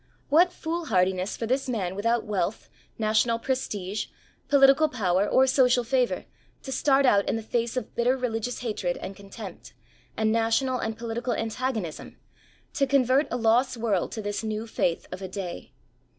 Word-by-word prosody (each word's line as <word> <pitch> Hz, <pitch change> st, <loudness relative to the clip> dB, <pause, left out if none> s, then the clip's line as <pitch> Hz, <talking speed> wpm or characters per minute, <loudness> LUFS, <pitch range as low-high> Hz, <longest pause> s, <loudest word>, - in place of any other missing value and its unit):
What 345 Hz, +5 st, +5 dB
foolhardiness 195 Hz, -, -1 dB
for 230 Hz, -, -3 dB
this 260 Hz, +3 st, -1 dB
man 190 Hz, -7 st, -2 dB
without 230 Hz, +3 st, +1 dB
wealth, 200 Hz, -1 st, -3 dB, 0.3 s
national 220 Hz, +1 st, +2 dB
prestige, 215 Hz, -6 st, -3 dB, 0.4 s
political 280 Hz, +2 st, +5 dB
power 200 Hz, -6 st, +1 dB
or 260 Hz, -, +5 dB
social 255 Hz, -2 st, +3 dB
favour 250 Hz, 0 st, 0 dB, 0.4 s
to 265 Hz, -, -6 dB
start 275 Hz, 0 st, +3 dB
out 200 Hz, -5 st, +3 dB
in -, -, +1 dB
the 225 Hz, -, -4 dB
face 235 Hz, +2 st, -1 dB
of 255 Hz, -, -4 dB
bitter 245 Hz, +2 st, +2 dB
religious 245 Hz, -1 st, -3 dB
hatred 210 Hz, -7 st, -2 dB
and 195 Hz, -, -7 dB
contempt, 200 Hz, 0 st, -10 dB, 0.4 s
and 220 Hz, 0 st, +2 dB
national 230 Hz, +3 st, +1 dB
and 220 Hz, 0 st, -3 dB
political 235 Hz, +1 st, -3 dB
antagonism, 225 Hz, -6 st, -3 dB, 0.6 s
to 275 Hz, -, +1 dB
convert 270 Hz, +1 st, +3 dB
a 245 Hz, -, -2 dB
lost 240 Hz, +2 st, +2 dB
world 215 Hz, -6 st, 0 dB
to 220 Hz, -, -5 dB
this 205 Hz, +2 st, -3 dB
new 215 Hz, 0 st, -3 dB
faith 175 Hz, -6 st, -1 dB
of 185 Hz, -, -6 dB
a 190 Hz, -, -4 dB
day 185 Hz, -5 st, -6 dB
230 Hz, 160 wpm, -26 LUFS, 205-255 Hz, 0.6 s, What